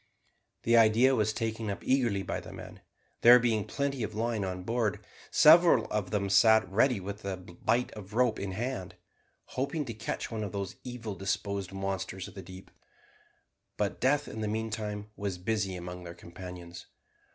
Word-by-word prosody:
The 115 - +3
idea 115 +4 +5
was 110 -2 +2
taken 110 -1 -3
up 100 - -5
eagerly 120 -7 +1
by - - -3
the - - -10
men; - - -10 0.4
there 120 +1 +9
being 115 -4 +1
plenty 140 -2 -2
of 110 -1 -3
line 115 -1 -1
on 90 -1 -4
board, 115 -1 -1 0.2
several 160 -6 +7
of 105 -3 -1
them 100 0 0
sat 105 +2 +5
ready 115 +3 +3
with 100 +2 -6
the 95 -1 -4
bight 110 +7 -1
of 100 -2 -10
a - - -9
rope 125 -2 +2
in 95 -1 -4
hand, 120 -2 -4 0.6
hoping 140 +3 -2
to 115 - -5
catch 110 +2 -4
one 110 -1 -3
of 105 - -5
those 100 -2 -4
evil 120 -4 -6
disposed 100 0 -3
monsters 95 -1 -4
of - - -12
the 95 - -8
deep. 95 0 -12 1.1
But 105 -1 -2
death 145 +3 +2
in 110 - -6
the 110 - -1
meantime 105 -1 -3
was 100 -3 -3
busy 100 0 -1
among 90 0 -7
their 85 -1 -8
companions. 85 0 -10
105 Hz, 175 wpm, -30 LUFS, 95-115 Hz, 1.1 s, there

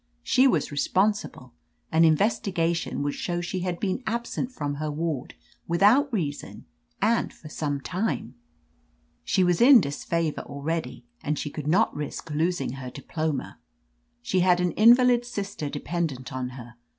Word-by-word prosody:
She 260 +2 +4
was 260 - +1
re 145 - -3
sponsible: 190 - 0 0.4
an 160 +1 +4
investigation 170 -2 +1
would 145 0 -1
show 175 -1 -3
sh^ 180 +1 -3
had 175 -1 -3
been 195 +4 -1
absent 235 +2 -2
from 145 - -4
her 155 - -1
ward 150 -3 -3 0.3
without 210 - +4
reason, 155 -10 -4 0.4
and 230 0 +2
for 155 - -13
some 145 -2 -2
time. 180 - -3 0.9
She 190 - +2
was 175 +1 +2
in 255 +1 +9
dis 140 -6 -3
favor 165 -2 -1
already, 160 +8 -4 0.2
and 150 -7 -2
she 145 - -4
could 150 -1 -6
not 190 +8 +3
risk 150 +2 -5
losing 165 0 0
her 130 -1 -6
diploma. 155 +2 -4 0.6
She 185 +9 +1
had 180 0 +4
an 180 -1 +1
invalid 240 +4 +5
sister 200 -10 -5
de 145 - -5
pendent 155 -8 -3
on 130 -1 -3
her. 120 -2 -11
170 Hz, 155 wpm, -26 LUFS, 145-200 Hz, 0.9 s, in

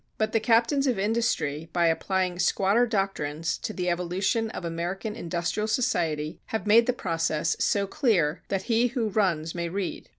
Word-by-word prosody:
But 215 0 0
the 225 - +2
captains 235 +5 +2
of 250 -5 +1
industry 195 -8 -1
by 175 -1 +2
applying 180 +2 0
squatter 200 +6 +3
doctrines 180 -6 -1
to - - -4
the 180 -4 -3
evolution 180 +6 0
of 185 - -6
American 175 +6 -3
industrial 175 +1 -2
society, 170 -11 -1
have 220 - -3
made 230 +3 +5
the - - +4
process 165 -8 -1
so 200 -1 +2
clear 195 - +1
that 195 -1 -2
he 230 +2 +2
who 235 -3 -1
runs 175 -6 0
may 170 -1 -3
read. 190 +1 -4
195 Hz, 165 wpm, -26 LUFS, 170-225 Hz, -, made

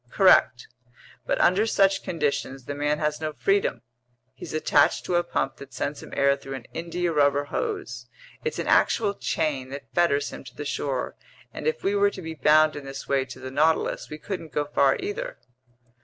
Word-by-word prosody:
"Correct, 120 - +4 0.6
but - - +1
under 195 +5 +4
such 195 -2 +3
conditions 140 -5 -2
the 145 - -4
man 145 +1 0
has 150 0 -1
no 155 -1 -2
freedom. 145 - 0 0.5
He's - - -9
attached 155 -2 +2
to - - -2
a 175 0 +3
pump 135 -5 -2
that 135 -2 -12
sends 140 +3 -3
him - - -11
air 140 0 +4
through 135 -1 -8
an 125 -4 -8
india 170 +1 -2
rubber 145 -1 +3
hose; 410 - -4 0.4
it's 465 0 -2
an - - -2
actual 210 -3 +3
chain 145 -9 -2
that 140 +1 -9
fetters 145 -5 +2
him - - -8
to - - -12
the 150 - -6
shore, 135 -2 -2 0.4
and - - -5
if 470 - -1
we 195 - +1
were 205 0 +4
to 195 - -9
be 160 0 -5
bound 155 +1 +4
in 145 - -6
this 135 0 -8
way 135 -1 +1
to 135 - -10
the 130 0 -7
Nautilus, 155 +4 +1
we 150 - -6
couldn't 165 -2 -6
go 145 +1 -1
far 140 -2 +3
either." - - -4
150 Hz, 195 wpm, -25 LUFS, 140-180 Hz, 0.6 s, Correct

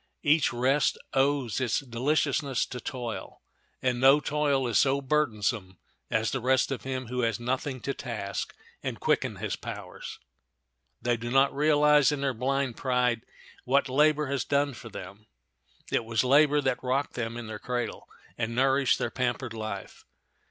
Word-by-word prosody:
Each 150 +1 +4
rest 130 +4 +2 0.2
owes 135 -4 +1
its 120 -4 +1
deliciousness 140 +1 0
to 125 - -7
toil, 120 -2 -6 0.4
and 125 -1 +1
no 135 +3 +7
toil 145 -3 +1
is 115 -3 +3
so 135 +1 +3
burdensome 115 - -1 0.3
as 110 +1 +1
the 135 - -1
rest 130 +2 +2
of 135 - -3
him 130 -1 -4
who 125 +2 -2
has 115 -2 0
nothing 130 +2 -2
to 140 - -2
task 110 -8 -5 0.3
and - - -4
quicken - - +1
his - - -3
powers. - - -8 0.9
They 120 0 +1
do 120 +1 -5
not 135 +2 +3
realize, 150 0 +5
in 145 -2 -2
their 135 -1 0
blind 130 +1 -1
pride, 125 -3 +1 0.4
what 140 +2 +2
labor 150 +3 +3
has 140 -1 -1
done 140 0 +1
for 115 -1 -10
them. 100 +2 -10 0.6
It - - +1
was 115 +1 0
labor 145 +3 +5
that 130 -2 -1
rocked 130 +3 0
them 115 -1 -3
in 120 - -6
their 110 -1 -6
cradle 120 0 -4 0.3
and 115 0 -2
nourished 135 -1 +3
their 120 - -2
pampered 125 -1 -2
life. 110 -3 -6
130 Hz, 160 wpm, -28 LUFS, 115-140 Hz, 0.9 s, no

